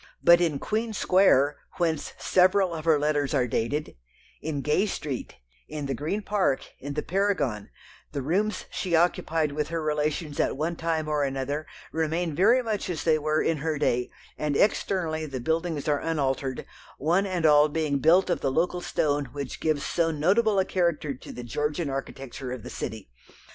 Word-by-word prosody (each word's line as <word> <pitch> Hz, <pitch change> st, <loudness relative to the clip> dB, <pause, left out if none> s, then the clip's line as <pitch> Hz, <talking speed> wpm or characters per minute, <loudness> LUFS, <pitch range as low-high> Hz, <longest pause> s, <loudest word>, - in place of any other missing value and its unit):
But 170 Hz, 0 st, +7 dB
in 160 Hz, -5 st, +1 dB
Queen 220 Hz, +7 st, -2 dB
Square, 180 Hz, -8 st, +4 dB, 0.2 s
whence 165 Hz, -4 st, -1 dB
several 185 Hz, 0 st, +3 dB
of 160 Hz, -1 st, -6 dB
her 160 Hz, -2 st, +5 dB
letters 145 Hz, -1 st, 0 dB
are 130 Hz, -3 st, +3 dB
dated, 125 Hz, -, -2 dB, 0.4 s
in 150 Hz, -3 st, -3 dB
Gay 150 Hz, +9 st, +2 dB
Street, 150 Hz, -9 st, -4 dB, 0.3 s
in 150 Hz, -1 st, -5 dB
the 135 Hz, -, -2 dB
Green 160 Hz, -, -3 dB
Park, 195 Hz, -11 st, +1 dB
in 140 Hz, +1 st, -6 dB
the 150 Hz, -, -1 dB
Paragon, 170 Hz, -, 0 dB, 0.4 s
the 140 Hz, -3 st, -3 dB
rooms 200 Hz, +9 st, 0 dB
she 180 Hz, -3 st, -1 dB
occupied 160 Hz, -2 st, +1 dB
with 150 Hz, +1 st, -2 dB
her 165 Hz, +1 st, -2 dB
relations 150 Hz, 0 st, -1 dB
at -, -, +1 dB
one 165 Hz, +3 st, -1 dB
time 160 Hz, -1 st, -1 dB
or 150 Hz, -1 st, +1 dB
another 140 Hz, +2 st, -2 dB, 0.2 s
remain 160 Hz, +1 st, -1 dB
very 225 Hz, -, +4 dB
much 215 Hz, -4 st, -2 dB
as 165 Hz, -4 st, -3 dB
they 155 Hz, -2 st, +3 dB
were 155 Hz, +1 st, +1 dB
in 165 Hz, -, +1 dB
her 155 Hz, +1 st, -2 dB
day, 125 Hz, -4 st, +1 dB, 0.3 s
and 150 Hz, -2 st, 0 dB
externally 165 Hz, -6 st, +1 dB
the 135 Hz, -3 st, -5 dB
buildings 160 Hz, +2 st, -1 dB
are 145 Hz, -1 st, +2 dB
unaltered, 135 Hz, -4 st, -1 dB, 0.3 s
one 175 Hz, +8 st, +2 dB
and 180 Hz, -4 st, -1 dB
all 150 Hz, 0 st, +6 dB
being 150 Hz, -2 st, 0 dB
built 175 Hz, +6 st, +4 dB
of -, -, 0 dB
the 135 Hz, -, 0 dB
local 175 Hz, +4 st, 0 dB
stone 145 Hz, -4 st, 0 dB
which 140 Hz, -2 st, -5 dB
gives 155 Hz, -3 st, 0 dB
so 165 Hz, -1 st, +1 dB
notable 195 Hz, +8 st, +2 dB
a 190 Hz, -, +3 dB
character 170 Hz, -5 st, 0 dB
to 130 Hz, -, -11 dB
the 125 Hz, -, -7 dB
Georgian 150 Hz, +5 st, -2 dB
architecture 135 Hz, -1 st, -6 dB
of 125 Hz, -4 st, -6 dB
the -, -, -8 dB
city. 110 Hz, -, -6 dB
155 Hz, 180 wpm, -26 LUFS, 145-175 Hz, 0.4 s, But